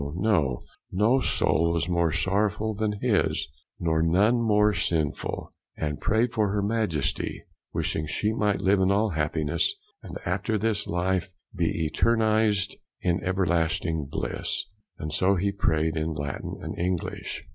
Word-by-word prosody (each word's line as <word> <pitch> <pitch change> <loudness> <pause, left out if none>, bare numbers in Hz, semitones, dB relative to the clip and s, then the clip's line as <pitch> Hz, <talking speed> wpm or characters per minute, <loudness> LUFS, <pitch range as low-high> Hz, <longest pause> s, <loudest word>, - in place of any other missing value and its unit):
No 110 +7 +4
soul 85 -8 +2
was 85 0 0
more 85 -2 +2
sorrowful 105 +5 0
than 105 0 -1
his, 115 -5 +1 0.3
nor 80 -2 +1
none 100 +9 +3
more 105 -2 +4
sinful; 80 -6 -2 0.2
and 75 -2 -3
prayed 110 +4 +2
for 110 -3 +2
her 100 0 0
Majesty, 100 -9 -1 0.3
wishing 75 - -1
she 105 +8 0
might 105 -3 +1
live 95 0 +3
in 95 0 +3
all 105 +3 +3
happiness, 80 0 0 0.3
and - - -7
after 100 +5 0
this 105 -1 0
life, 90 +1 0 0.3
be 80 - 0
eternized 110 +2 +2 0.3
in 90 0 0
everlasting 85 -3 0
bliss; - - -3 0.3
and 75 -1 -5
so 95 +5 +3
he 100 +2 0
prayed 80 -4 +1
in 80 +1 -1
Latin 70 -2 -4
and - - -5
English. 90 -1 -3
95 Hz, 135 wpm, -26 LUFS, 80-105 Hz, 0.3 s, No